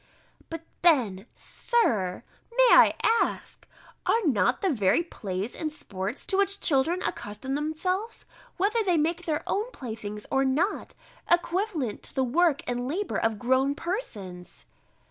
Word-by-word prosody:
But 330 0 -6 0.2
then, 240 - +3
Sir, 215 - 0 0.3
may - - +7
I - - +7
ask, 455 +1 0 0.4
Are 460 - +3
not 245 - +2
the 385 - +2
very 215 - +2
plays 200 - -5
and 310 -1 -3
sports, 200 -5 -5
to 385 - 0
which 400 0 +1
children 325 +5 +2
accustom 210 +6 -4
themselves, 365 +9 -2 0.3
whether 425 +5 +2
they 360 -4 +2
make 335 +3 0
their 305 -1 -1
own 430 +4 -1
playthings 220 - -7
or 270 0 +3
not, 295 +10 0 0.3
equivalent 345 - 0
to - - -4
the 265 - +2
work 300 +4 +2
or 245 - 0
labour 275 +12 -2
of 225 -1 0
grown 260 +5 +2
persons! 195 - -6
290 Hz, 140 wpm, -27 LUFS, 225-360 Hz, 0.4 s, may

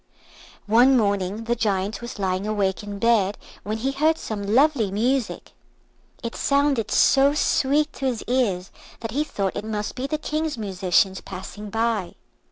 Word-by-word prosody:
One 245 +5 +5
morning 200 -1 0
the 235 +1 0
Giant 205 -2 -1
was 235 -1 -7
lying 190 0 -1
awake 200 -3 0
in 205 -1 -7
bed 210 -3 +2 0.2
when 215 +2 -3
he 260 +5 -1
heard 310 +4 +2
some 215 -2 -5
lovely 275 -6 +4
music. 235 +5 -1 0.7
It 235 - -4
sounded 280 -6 +1
so 275 +1 +4
sweet 295 +1 +2
to 270 - -3
his 240 -4 -2
ears 210 -8 0 0.3
that 225 -1 -4
he 290 +6 0
thought 200 -10 -3
it - - -3
must 210 -1 -3
be 265 +1 -4
the 305 - -1
King's 305 -1 -2
musicians 190 -2 +1
passing 200 +2 -8
by. 225 -3 -1
225 Hz, 160 wpm, -23 LUFS, 200-265 Hz, 0.7 s, One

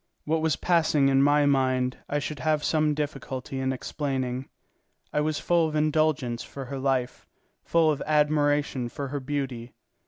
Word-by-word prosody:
What 160 +1 0
was 160 -3 +2
passing 155 -5 +2
in 135 0 +4
my 145 +1 +4
mind 130 -2 +1
I 145 - 0
should 145 0 -4
have 155 -1 +1
some 155 -2 +2
difficulty 135 -3 -4
in 130 0 0
explaining. 130 -1 -3 0.6
I 150 - +2
was 155 0 0
full 170 -2 +2
of 155 - -5
indulgence 150 -5 +1
for 135 -1 -8
her 135 +2 -5
life, 130 -2 -1 0.4
full 165 -2 +3
of 145 -2 -3
admiration 145 -4 +2
for 140 +2 -5
her 145 +1 -3
beauty. 130 -4 -4
145 Hz, 160 wpm, -26 LUFS, 130-155 Hz, 0.6 s, in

